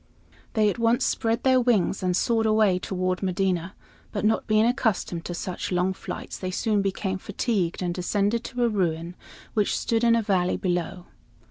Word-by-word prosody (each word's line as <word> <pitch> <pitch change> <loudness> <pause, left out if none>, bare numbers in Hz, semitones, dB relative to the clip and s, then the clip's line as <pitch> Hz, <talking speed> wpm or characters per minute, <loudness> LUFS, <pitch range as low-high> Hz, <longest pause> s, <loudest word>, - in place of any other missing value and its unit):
They 215 -2 +3
at 205 - -1
once 230 +1 +2
spread 225 0 0
their 260 -1 +4
wings 220 -6 +1
and 180 -1 +1
soared 225 0 +2
away 215 -4 +3
toward 185 -1 -2
Medina, 185 -1 -1 0.4
but 210 0 -2
not 220 - +1
being 215 0 +4
accustomed 220 -9 0
to 175 - -4
such 180 +1 -4
long 180 +1 +1
flights, - - -7
they 185 - -3
soon 205 +2 0
became 190 -1 -2
fatigued 195 -4 -1
and 175 -1 -1
descended 205 +5 0
to 245 -1 -2
a - - +4
ruin 175 -5 -1 0.4
which 210 -2 +1
stood 230 0 0
in 230 -1 +5
a 230 - +1
valley 185 -3 +1
below. 180 0 -2
195 Hz, 175 wpm, -25 LUFS, 180-225 Hz, 0.4 s, in